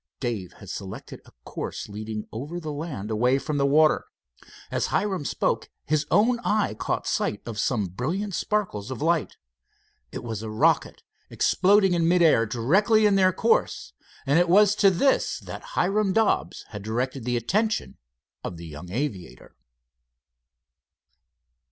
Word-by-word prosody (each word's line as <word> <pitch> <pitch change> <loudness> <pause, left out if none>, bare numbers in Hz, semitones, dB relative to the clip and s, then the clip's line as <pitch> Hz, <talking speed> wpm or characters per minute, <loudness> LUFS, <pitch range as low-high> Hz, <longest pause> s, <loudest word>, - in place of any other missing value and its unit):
Dave 115 -8 -4
had - - -14
selected - - -8
a - - -17
course - - -5
leading 105 +1 -6
over 145 +10 -5
the 155 -3 -5
land, 145 -9 -5
away 125 +5 +2
from 145 +2 -3
the 140 0 +2
water. 155 +2 +4 0.7
As - - 0
Hiram 190 -6 -1
spoke, - - -1 0.2
his 155 0 0
own 230 +7 +3
eye 215 - 0
caught 110 - -3
sight 105 - -1
of 115 -3 -6
some 110 -4 0
brilliant 160 - -3
sparkles 180 - -2
of 130 - -5
light. 165 +1 0 0.7
It - - -6
was 110 -3 -5
a 110 - -5
rocket, 110 +1 +1 0.3
exploding 195 0 +3
in 170 -1 +2
mid 175 0 +4
air 115 -8 +4
directly 190 - +3
in 205 - +4
their 190 -1 +4
course, 455 - 0 0.3
and 145 +4 +3
it 175 -1 +2
was 205 +3 +6
to 200 - +6
this 265 +9 +1
that - - -9
Hiram 200 -1 +2
Dobbs 225 0 +1
had 105 -2 -7
directed 125 +5 -3
the 120 0 0
attention 215 - -1 0.4
of 85 - -5
the 85 - -9
young 80 +2 -9
aviator. 95 - -5
150 Hz, 150 wpm, -25 LUFS, -, 0.7 s, was